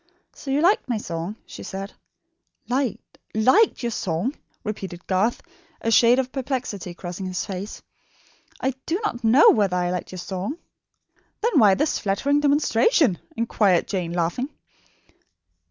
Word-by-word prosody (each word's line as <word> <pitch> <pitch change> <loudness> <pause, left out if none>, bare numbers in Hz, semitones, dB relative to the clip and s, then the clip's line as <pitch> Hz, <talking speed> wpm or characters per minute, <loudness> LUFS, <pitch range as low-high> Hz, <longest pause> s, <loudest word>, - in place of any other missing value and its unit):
"So 275 - -9
you 275 +2 +2
liked 360 -4 +3
my 235 - +1
song?" 175 -1 -4
she - - -10
said. 195 +1 -6 0.7
"Liked 255 -1 -2 0.2
liked 260 - +4
your 235 - -1
song?" 195 - -2 0.3
repeated 190 -4 -6
Garth, 200 +5 0 0.4
a 230 - -1
shade 235 +2 +6
of 260 -1 -1
perplexity 250 -10 -4
crossing 180 +1 -6
his 185 -1 -3
face. 195 +2 -6 0.8
"I 265 +1 0
do 340 +4 0
not 240 - -3
know 230 +6 +7
whether 195 -4 +2
I 175 0 0
liked 180 -1 -4
your 185 - -7
song." 190 - -4 0.8
"Then 445 -8 +3
why 205 -4 +6
this 300 +6 0
flattering 270 +9 +1
demonstration?" 295 - +3 0.2
inquired 205 -6 +2
Jane, 180 -4 -2
laughing. 175 - -1
220 Hz, 140 wpm, -24 LUFS, 185-265 Hz, 0.8 s, know